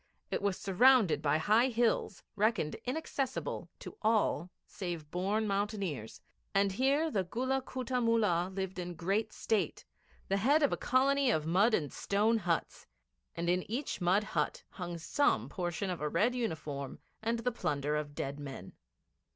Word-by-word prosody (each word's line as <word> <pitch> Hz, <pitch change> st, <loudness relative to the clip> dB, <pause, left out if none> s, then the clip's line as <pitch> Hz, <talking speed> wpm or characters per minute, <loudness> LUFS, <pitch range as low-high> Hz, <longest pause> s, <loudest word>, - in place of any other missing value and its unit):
It -, -, -1 dB
was 200 Hz, -2 st, 0 dB
surrounded 220 Hz, -1 st, +4 dB
by 150 Hz, 0 st, +2 dB
high 215 Hz, +9 st, +4 dB
hills, 230 Hz, -5 st, 0 dB
reckoned 205 Hz, -7 st, +1 dB
inaccessible 270 Hz, 0 st, -3 dB
to -, -, -10 dB
all 210 Hz, -6 st, +2 dB, 0.2 s
save 170 Hz, -6 st, -6 dB
born 200 Hz, +5 st, 0 dB
mountaineers, 195 Hz, -, -2 dB, 0.4 s
and 195 Hz, 0 st, +3 dB
here 275 Hz, +9 st, +2 dB
the 195 Hz, -6 st, +1 dB
Gulla 260 Hz, +8 st, -1 dB
Kutta 255 Hz, -1 st, -2 dB
Mullah 210 Hz, -7 st, +2 dB
lived 190 Hz, -1 st, -4 dB
in 175 Hz, -1 st, -5 dB
great 200 Hz, +6 st, 0 dB
state, 220 Hz, -2 st, -1 dB, 0.4 s
the 195 Hz, -, +1 dB
head 285 Hz, +9 st, +3 dB
of 285 Hz, -, +3 dB
a -, -, +2 dB
colony 275 Hz, +1 st, +2 dB
of 155 Hz, -10 st, +1 dB
mud 200 Hz, +8 st, +4 dB
and 145 Hz, -4 st, -2 dB
stone 215 Hz, +3 st, +2 dB
huts, 170 Hz, -5 st, -2 dB, 0.5 s
and 170 Hz, 0 st, -3 dB
in 180 Hz, +1 st, +2 dB
each 245 Hz, -2 st, -3 dB
mud 185 Hz, +4 st, +3 dB
hut 160 Hz, -8 st, -2 dB
hung 175 Hz, -2 st, -5 dB
Some 170 Hz, -, +1 dB
portion 180 Hz, +4 st, -2 dB
of 175 Hz, -, -5 dB
a 150 Hz, -, 0 dB
red 210 Hz, +11 st, +2 dB
uniform 155 Hz, -, -3 dB, 0.2 s
and 230 Hz, +1 st, 0 dB
the 230 Hz, +2 st, -1 dB
plunder 150 Hz, -, -1 dB
of 150 Hz, -1 st, -3 dB
dead 140 Hz, +1 st, -4 dB
men. 135 Hz, -10 st, -8 dB
200 Hz, 160 wpm, -32 LUFS, 170-235 Hz, 0.5 s, surrounded